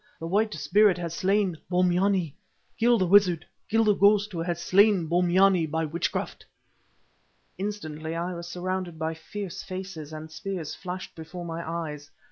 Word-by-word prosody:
The 165 Hz, -, -5 dB
White 210 Hz, +5 st, +1 dB
Spirit 185 Hz, +6 st, +4 dB
has 170 Hz, -2 st, -4 dB
slain 190 Hz, -1 st, +1 dB
Bombyane. 180 Hz, -2 st, +2 dB, 0.5 s
Kill 235 Hz, +1 st, +5 dB
the 185 Hz, -, +2 dB
wizard, 180 Hz, -3 st, +4 dB, 0.2 s
kill 225 Hz, +1 st, +3 dB
the 210 Hz, -1 st, +4 dB
ghost 205 Hz, +1 st, +4 dB
who 170 Hz, -, -5 dB
has 170 Hz, 0 st, -2 dB
slain 195 Hz, -1 st, +4 dB
Bombyane 180 Hz, 0 st, +3 dB
by 160 Hz, +1 st, -1 dB
witchcraft." 165 Hz, +3 st, -3 dB, 1.2 s
Instantly 160 Hz, -6 st, -4 dB
I 175 Hz, +2 st, -2 dB
was 170 Hz, 0 st, -7 dB
surrounded 180 Hz, -1 st, -3 dB
by 160 Hz, 0 st, -2 dB
fierce 190 Hz, +3 st, -7 dB
faces, 185 Hz, -5 st, -7 dB
and 155 Hz, 0 st, -8 dB
spears 170 Hz, -1 st, -5 dB
flashed 185 Hz, 0 st, -7 dB
before 170 Hz, +2 st, -8 dB
my 165 Hz, 0 st, -4 dB
eyes. 150 Hz, -4 st, -5 dB
180 Hz, 150 wpm, -27 LUFS, 165-195 Hz, 1.2 s, Kill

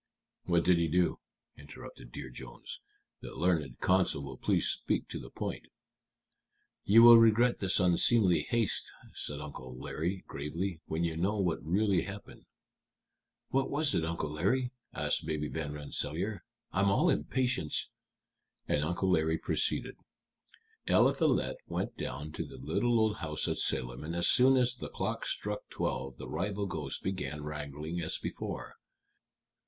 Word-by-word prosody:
"What 85 Hz, -1 st, +2 dB
did 90 Hz, -2 st, +5 dB
he 85 Hz, -, +2 dB
do?" 90 Hz, +2 st, +1 dB, 0.4 s
interrupted 70 Hz, -4 st, -12 dB
Dear 65 Hz, 0 st, -7 dB
Jones. -, -, -9 dB, 0.4 s
"The -, -, -9 dB
learned 80 Hz, -7 st, 0 dB
counsel 95 Hz, -6 st, +2 dB
will 65 Hz, -2 st, -7 dB
please -, -, +2 dB
speak -, -, 0 dB
to -, -, -5 dB
the -, -, -10 dB
point." -, -, -5 dB, 1.2 s
"You 110 Hz, +4 st, +7 dB
will 120 Hz, -1 st, +11 dB
regret 115 Hz, +2 st, +4 dB
this 95 Hz, 0 st, +3 dB
unseemly 90 Hz, +1 st, +4 dB
haste," 115 Hz, -4 st, +1 dB, 0.2 s
said 70 Hz, -1 st, -3 dB
Uncle 65 Hz, -3 st, -8 dB
Larry, 85 Hz, +8 st, -3 dB
gravely, 80 Hz, +5 st, -4 dB
"when 80 Hz, +2 st, -1 dB
you 85 Hz, -2 st, -1 dB
know 100 Hz, +6 st, 0 dB
what 90 Hz, -4 st, 0 dB
really 95 Hz, +2 st, +2 dB
happened." 100 Hz, +4 st, -9 dB, 1.0 s
"What 135 Hz, 0 st, +1 dB
was 145 Hz, 0 st, +2 dB
it, 80 Hz, -, +1 dB
Uncle 80 Hz, -2 st, -2 dB
Larry?" 120 Hz, +11 st, 0 dB, 0.2 s
asked -, -, -1 dB
Baby 75 Hz, -2 st, -2 dB
Van 80 Hz, -3 st, -4 dB
Rensselaer. 80 Hz, +6 st, -3 dB, 0.3 s
"I'm 100 Hz, +1 st, +2 dB
all 150 Hz, -, +3 dB
impatience." 125 Hz, -, 0 dB, 0.8 s
And 75 Hz, -, +1 dB
Uncle 90 Hz, +4 st, 0 dB
Larry 80 Hz, -1 st, +2 dB
proceeded: -, -, -1 dB, 0.9 s
"Eliphalet -, -, +3 dB
went -, -, -3 dB
down 75 Hz, +2 st, -5 dB
to -, -, -4 dB
the -, -, -11 dB
little 115 Hz, -, +1 dB
old 110 Hz, -1 st, +2 dB
house 75 Hz, -1 st, -2 dB
at -, -, 0 dB
Salem, 65 Hz, +1 st, -1 dB
and 80 Hz, +2 st, -4 dB
as 85 Hz, -, +2 dB
soon 130 Hz, +1 st, +6 dB
as 125 Hz, -1 st, +3 dB
the 125 Hz, -, -7 dB
clock -, -, -3 dB
struck 105 Hz, 0 st, -3 dB
twelve 65 Hz, -2 st, -3 dB
the -, -, -8 dB
rival 100 Hz, +1 st, -2 dB
ghosts 80 Hz, -8 st, -4 dB
began 75 Hz, -6 st, -4 dB
wrangling 75 Hz, +3 st, -5 dB
as 80 Hz, -, -1 dB
before. -, -, -6 dB
85 Hz, 150 wpm, -31 LUFS, 75-105 Hz, 1.2 s, will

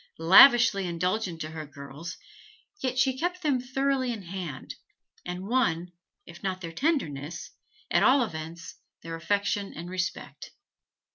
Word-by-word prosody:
Lavishly 200 Hz, +3 st, +7 dB
indulgent 180 Hz, 0 st, -2 dB
to 155 Hz, -, -5 dB
her 155 Hz, -1 st, -7 dB
girls, 140 Hz, +4 st, -9 dB, 0.8 s
she 265 Hz, +1 st, +3 dB
yet 260 Hz, -, -9 dB
kept 360 Hz, +1 st, -2 dB
them 285 Hz, -4 st, +2 dB
thoroughly 265 Hz, 0 st, 0 dB
in 220 Hz, -4 st, -6 dB
hand, 175 Hz, -6 st, -6 dB, 0.5 s
and 180 Hz, +2 st, -5 dB
won, 180 Hz, -8 st, +1 dB, 0.3 s
if 170 Hz, -, -13 dB
not 190 Hz, -1 st, -2 dB
their 170 Hz, -3 st, -6 dB
tenderness, 165 Hz, -, -2 dB, 0.4 s
at -, -, +4 dB
all 260 Hz, 0 st, +5 dB
events 165 Hz, -3 st, -7 dB, 0.3 s
their 165 Hz, -, -6 dB
affection 200 Hz, +4 st, -1 dB
and 170 Hz, +3 st, -7 dB
respect. 185 Hz, -, -4 dB
185 Hz, 135 wpm, -27 LUFS, 165-250 Hz, 0.8 s, Lavishly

